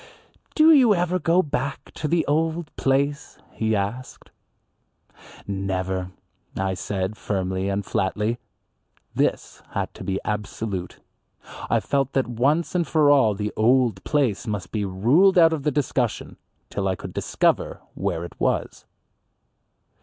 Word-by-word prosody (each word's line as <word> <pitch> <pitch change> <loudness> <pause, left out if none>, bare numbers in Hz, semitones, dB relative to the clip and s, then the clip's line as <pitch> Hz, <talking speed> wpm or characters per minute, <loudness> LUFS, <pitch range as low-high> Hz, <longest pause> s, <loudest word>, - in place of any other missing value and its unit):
"Do 315 +1 +7
you 250 -8 +6
ever 180 +1 0
go 175 +2 +3
back 140 -1 -4
to 155 - -3
the 165 +1 +1
old 160 +2 -1
place?" 140 +2 0
he 110 -1 0
asked. 105 +6 -4 1.1
"Never," 95 -2 -2 0.5
I 95 0 0
said, 95 +2 -3
firmly 95 -1 -2
and 100 0 -2
flatly. 105 +3 -1 0.7
This - - -1
had - - -2
to - - -9
be 95 0 -2
absolute. 105 -3 -4 0.7
I - - +3
felt 135 -1 -1
that 135 - +2
once 135 +8 0
and 175 -3 0
for 150 -1 +4
all 115 -8 +4
the 105 +1 -3
"old 115 -3 +2
place" 130 -7 0
must 100 -4 -4
be 105 -2 -1
ruled 130 - +4
out 165 -2 +6
of 155 - -2
the 150 - +1
discussion 130 -4 -1 0.3
till 100 -1 -1
I 95 - 0
could - - -9
discover - - 0
where 85 +1 -2
it 85 - -10
was. - - -1
115 Hz, 140 wpm, -24 LUFS, 100-150 Hz, 1.1 s, Do